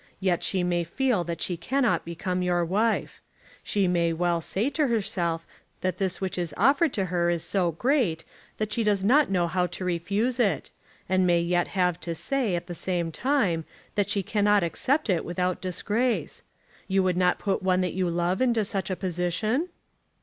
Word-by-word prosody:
Yet 185 Hz, -3 st, +1 dB
she 185 Hz, -2 st, 0 dB
may 175 Hz, -1 st, +1 dB
feel 235 Hz, -, 0 dB
that 170 Hz, 0 st, -4 dB
she 180 Hz, -, 0 dB
cannot 260 Hz, +7 st, 0 dB
become 180 Hz, +2 st, -3 dB
your 175 Hz, -1 st, +1 dB
wife. 215 Hz, +6 st, 0 dB, 0.4 s
She 200 Hz, -2 st, +1 dB
may 170 Hz, -2 st, +2 dB
well 170 Hz, 0 st, 0 dB
say 200 Hz, +8 st, -1 dB
to 295 Hz, 0 st, +1 dB
herself 175 Hz, -8 st, -1 dB, 0.4 s
that 185 Hz, -1 st, -2 dB
this 190 Hz, -2 st, -1 dB
which 190 Hz, -1 st, -3 dB
is 170 Hz, -4 st, -3 dB
offered 285 Hz, +3 st, +4 dB
to 195 Hz, -, 0 dB
her 175 Hz, -1 st, +2 dB
is 170 Hz, -2 st, 0 dB
so 180 Hz, -4 st, 0 dB
great, 230 Hz, -, +1 dB, 0.3 s
that 215 Hz, 0 st, -2 dB
she 230 Hz, -, +1 dB
does 205 Hz, -3 st, +1 dB
not 280 Hz, +9 st, +4 dB
know 180 Hz, -3 st, +2 dB
how 180 Hz, +1 st, 0 dB
to 180 Hz, +2 st, -5 dB
refuse 200 Hz, +8 st, -1 dB
it; 195 Hz, -, +1 dB, 0.4 s
and 185 Hz, 0 st, +2 dB
may 175 Hz, -1 st, +4 dB
yet 175 Hz, +1 st, +1 dB
have 180 Hz, -2 st, +2 dB
to 165 Hz, +1 st, -4 dB
say, 250 Hz, -, 0 dB
at 170 Hz, -, -3 dB
the 175 Hz, -, -6 dB
same 175 Hz, -1 st, -2 dB
time, 205 Hz, -, +1 dB, 0.3 s
that 205 Hz, -1 st, 0 dB
she 200 Hz, -2 st, 0 dB
cannot 205 Hz, -1 st, +2 dB
accept 270 Hz, -, 0 dB
it 180 Hz, -5 st, +1 dB
without 180 Hz, +1 st, -2 dB
disgrace. 210 Hz, +6 st, -1 dB, 0.5 s
You 195 Hz, 0 st, +2 dB
would 185 Hz, -1 st, +1 dB
not 180 Hz, 0 st, +2 dB
put 195 Hz, -1 st, -1 dB
one 185 Hz, -1 st, +2 dB
that 180 Hz, -, -1 dB
you 185 Hz, -1 st, 0 dB
love 175 Hz, +3 st, 0 dB
into 235 Hz, -4 st, +2 dB
such 195 Hz, -2 st, -3 dB
a 185 Hz, -, -1 dB
position?" 185 Hz, -, -1 dB
185 Hz, 190 wpm, -26 LUFS, 175-210 Hz, 0.5 s, offered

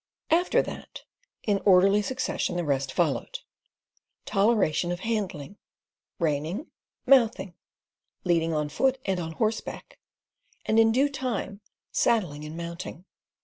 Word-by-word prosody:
After 345 Hz, +3 st, +3 dB
that, -, -, -9 dB, 0.4 s
in 205 Hz, -2 st, +1 dB
orderly 195 Hz, +1 st, +5 dB
succession 255 Hz, -4 st, -2 dB
the 175 Hz, -, -1 dB
rest 140 Hz, -3 st, -1 dB
followed: -, -, 0 dB, 0.9 s
toleration 195 Hz, -5 st, +2 dB
of 175 Hz, +1 st, -4 dB
handling, 200 Hz, -6 st, -3 dB, 0.6 s
reining, 165 Hz, -, -2 dB, 0.3 s
mouthing, 230 Hz, -8 st, +4 dB, 0.7 s
leading 165 Hz, -2 st, +2 dB
on 150 Hz, -2 st, -1 dB
foot, 265 Hz, -, +1 dB
and 190 Hz, -2 st, 0 dB
on 165 Hz, -1 st, -4 dB
horseback 220 Hz, +5 st, -3 dB, 0.7 s
and 220 Hz, -, +3 dB
in 225 Hz, 0 st, +5 dB
due 265 Hz, +5 st, +3 dB
time 245 Hz, -7 st, -4 dB, 0.3 s
saddling 170 Hz, -11 st, +1 dB
and 155 Hz, +2 st, -7 dB
mounting. 170 Hz, +1 st, -7 dB
195 Hz, 115 wpm, -27 LUFS, 165-225 Hz, 0.9 s, orderly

